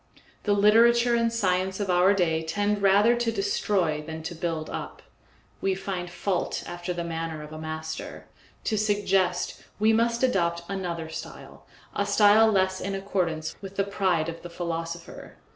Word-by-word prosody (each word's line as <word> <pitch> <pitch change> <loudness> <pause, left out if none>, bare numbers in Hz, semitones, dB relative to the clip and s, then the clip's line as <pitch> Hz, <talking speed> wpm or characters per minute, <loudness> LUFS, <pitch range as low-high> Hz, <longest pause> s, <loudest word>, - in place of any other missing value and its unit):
The 205 - +3
literature 235 +4 +5
and 230 -1 +2
science 190 -3 0
of 200 -3 0
our 180 +3 +4
day 165 -4 +1
tend 205 +5 -1
rather 200 +4 +5
to 240 -1 0
destroy 195 -6 0
than 160 +1 -7
to 170 +2 -4
build 165 -2 -3
up. - - -7 0.6
We 195 -1 +1
find 185 -2 -4
fault 175 +1 -2
after 175 +1 -5
the 175 -1 -3
manner 165 -2 -4
of 150 +1 -10
a 155 - -7
master; 160 0 -6 0.4
to 215 - 0
suggest, 205 -3 0
we 215 +2 +4
must 235 +2 +1
adopt 170 -8 +1
another 175 -4 -4
style, 160 - -9 0.3
a 200 - 0
style 210 +2 +6
less 190 -2 +1
in 195 +1 -3
accordance 175 -5 -2
with 195 0 -8
the 195 - +2
pride 190 -5 0
of 165 0 -6
the 175 - -8
philosopher. 170 -1 -6
190 Hz, 160 wpm, -26 LUFS, 170-205 Hz, 0.6 s, style